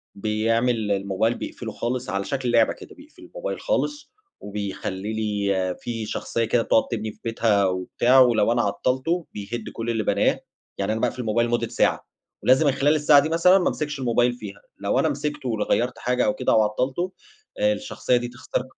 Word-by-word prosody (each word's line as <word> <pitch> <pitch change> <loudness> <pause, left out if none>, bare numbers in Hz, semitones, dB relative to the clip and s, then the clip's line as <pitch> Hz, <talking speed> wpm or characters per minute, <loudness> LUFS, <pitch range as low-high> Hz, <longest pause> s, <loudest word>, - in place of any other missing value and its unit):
بيعمل 110 +1 0
الموبايل 100 +4 0
بيقفله 110 -2 -6
خالص، 125 +3 -3
على 100 -1 -1
شكل 130 -4 -2
لعبة 115 -2 +4
كده، - - -13
بيقفل 295 +2 -17
الموبايل - - -5
خالص 295 -12 -2 0.3
وبيخلّي 100 0 -5
لي 100 -4 -1
في 115 -2 -4
شخصية 115 +2 -2
كده 115 +1 +2
بتقعد 110 - +3
تبني 110 -1 -3
في - - -23
بيتها 115 -3 +2
وبتاع 95 +8 +2
ولو 115 -3 +4
أنا 120 0 +2
عطّلته، 140 +10 -1
بيهِد 110 +3 -5
كل 115 +1 -4
اللي 110 -2 0
بناه. - - +2 0.4
يعني 100 +2 -1
أنا 110 - -3
باقفل 125 0 -1
الموبايل 120 +1 +1
لمدة 120 - 0
ساعة - - 0 0.4
ولازم 130 +5 +4
من - - +5
خلال 145 +2 +2
الساعة 150 -1 +6
دي 150 - 0
مثلًا 170 +3 +5
ما 180 - +1
أمسكش 150 -2 -4
الموبايل 120 0 +2
فيها، 100 -4 -9 0.2
لو - - 0
أنا - - +2
مسكته 150 -4 -3
ول 110 -2 0
غيّرت 120 +2 0
حاجة 125 0 +1
أو 105 - +2
كده - - 0
أو 110 - +5
عطّلته، 130 - -1 0.5
آآ، 260 0 +3
الشخصية 260 - -1
دي 120 0 -3
تختار 125 +1 -4
120 Hz, 185 wpm, -24 LUFS, 105-130 Hz, 0.5 s, الساعة